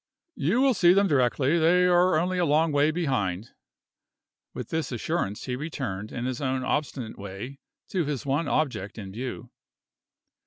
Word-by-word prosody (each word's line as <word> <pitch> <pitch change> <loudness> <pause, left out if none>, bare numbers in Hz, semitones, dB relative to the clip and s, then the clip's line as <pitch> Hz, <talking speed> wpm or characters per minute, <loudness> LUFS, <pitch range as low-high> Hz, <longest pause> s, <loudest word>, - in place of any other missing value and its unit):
"You 180 - +1
will 270 -1 +4
see 180 -4 +5
them 200 +1 +4
directly; 140 +2 +2
they 175 +3 +4
are 180 -1 +4
only 180 +3 0
a - - +3
long 155 +2 +3
way 145 +1 +3
behind." 120 - -1 1.0
With - - -7
this 160 -3 -2
assurance, 120 - -2
he 125 - -3
returned, 125 -9 -5
in 120 - -4
his 130 0 -3
own 130 -1 -1
obstinate 125 -6 -3
way, 100 +8 -7 0.3
to 185 -3 0
his 145 -3 -3
one 140 +3 0
object 120 -10 -1
in 100 -3 -7
view. 125 +5 -6
140 Hz, 160 wpm, -26 LUFS, 120-165 Hz, 1.0 s, see